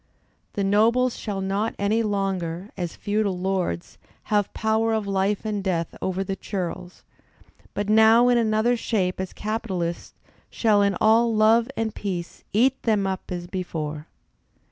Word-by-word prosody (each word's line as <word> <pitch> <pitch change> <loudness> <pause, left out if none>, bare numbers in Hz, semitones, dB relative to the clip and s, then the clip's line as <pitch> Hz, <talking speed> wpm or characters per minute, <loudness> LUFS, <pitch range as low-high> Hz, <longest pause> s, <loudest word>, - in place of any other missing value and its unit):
The 200 - -1
nobles 230 +5 +3
shall 200 -3 -4
not 200 +4 -1
any 210 +3 +1
longer, 195 -3 -2
as 175 -2 -4
feudal 205 -2 -1
lords, 180 - -2 0.3
have 205 -2 +2
power 220 +1 +1
of 215 -2 -1
life 195 +2 0
and 210 -2 -2
death 170 -4 -1
over 190 +1 -1
the 195 0 -3
churls, 180 -2 -5 0.7
but 205 0 -2
now 220 +3 +6
in 245 -1 +4
another 220 +2 +2
shape 190 -6 -1
as 190 -1 -3
capitalists, 195 -6 -3 0.3
shall 215 -3 +2
in 200 -2 +2
all 225 +1 +4
love 225 +2 +4
and 225 -1 -1
peace 180 -4 -5
eat 255 +5 +2
them 210 -4 +1
up 190 -1 -4
as 175 -1 -4
before. 160 -5 -5
200 Hz, 145 wpm, -24 LUFS, 185-220 Hz, 0.7 s, now